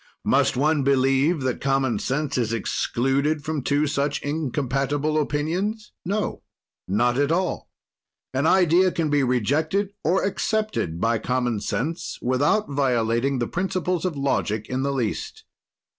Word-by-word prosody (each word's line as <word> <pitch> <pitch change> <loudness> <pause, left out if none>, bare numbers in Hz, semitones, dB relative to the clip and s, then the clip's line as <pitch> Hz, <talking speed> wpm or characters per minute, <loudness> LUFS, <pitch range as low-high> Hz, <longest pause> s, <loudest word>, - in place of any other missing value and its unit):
"Must - - +2
one 150 +2 +2
believe 135 +4 +2
that 130 -2 -2
common 135 -5 +1
sense 140 +1 -2
is 115 -3 0
excluded 135 +6 0
from 155 -2 -2
two 145 +3 +1
such 145 0 -1
incompatible 145 +1 -1
opinions? 180 +10 -2
"No, 205 +4 -2 0.5
not 120 +6 +1
at 145 +1 +2
all. 180 +1 -1 0.6
An 135 +4 +1
idea 180 +1 +4
can 160 -3 -1
be 145 -1 +3
rejected 145 - +1
or 180 +5 +2
accepted 205 - -1
by 115 +3 +1
common 125 -1 -1
sense 155 - -3
without 145 - +1
violating 130 -1 +1
the 120 - 0
principles 185 -1 -1
of 180 -5 -2
logic 110 -6 -1
in 130 +1 -1
the 140 +1 0
least. 125 -6 -3
140 Hz, 135 wpm, -24 LUFS, 130-160 Hz, 0.6 s, idea